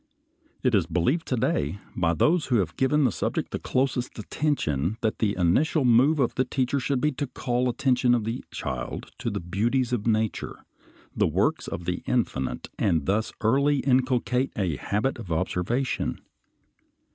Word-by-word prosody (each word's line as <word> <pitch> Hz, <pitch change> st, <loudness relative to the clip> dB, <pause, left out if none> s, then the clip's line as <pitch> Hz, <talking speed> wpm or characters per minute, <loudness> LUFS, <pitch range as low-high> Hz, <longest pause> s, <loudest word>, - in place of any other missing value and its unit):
It 130 Hz, -2 st, +2 dB
is 95 Hz, -6 st, +3 dB
believed 90 Hz, -, 0 dB
to 130 Hz, -, 0 dB
day 100 Hz, -, 0 dB, 0.2 s
by 85 Hz, -1 st, +1 dB
those 160 Hz, -, +2 dB
who 125 Hz, -, +2 dB
have 90 Hz, -7 st, 0 dB
given 145 Hz, +3 st, +2 dB
the 125 Hz, -, +3 dB
subject -, -, -2 dB
the -, -, -3 dB
closest 130 Hz, -1 st, -1 dB
attention 105 Hz, -, -1 dB
that 110 Hz, -, -1 dB
the 105 Hz, -2 st, +1 dB
initial 130 Hz, -, +2 dB
move 125 Hz, +6 st, +5 dB
of 130 Hz, -4 st, +1 dB
the 130 Hz, -, +1 dB
teacher 130 Hz, +1 st, 0 dB
should 135 Hz, 0 st, 0 dB
be 150 Hz, +3 st, +2 dB
to 140 Hz, +1 st, -3 dB
call 125 Hz, 0 st, -1 dB
the -, -, +2 dB
attention 125 Hz, -1 st, +2 dB
of 115 Hz, -, -1 dB
the 115 Hz, +3 st, -3 dB
child 65 Hz, -2 st, -5 dB
to -, -, -2 dB
the -, -, -3 dB
beauties 115 Hz, +9 st, 0 dB
of 115 Hz, -2 st, -1 dB
nature, 110 Hz, -1 st, -1 dB, 0.5 s
the -, -, +3 dB
works -, -, 0 dB
of 85 Hz, -, -5 dB
the 90 Hz, 0 st, -2 dB
Infinite, 65 Hz, -, -1 dB
and 80 Hz, -7 st, +1 dB
thus 105 Hz, +3 st, 0 dB
early 140 Hz, +5 st, +3 dB
inculcate 130 Hz, 0 st, +1 dB
a 90 Hz, -8 st, -1 dB
habit 110 Hz, -, -1 dB
of 95 Hz, -7 st, -8 dB
observation. 95 Hz, +10 st, -1 dB
120 Hz, 170 wpm, -26 LUFS, 95-130 Hz, 0.5 s, move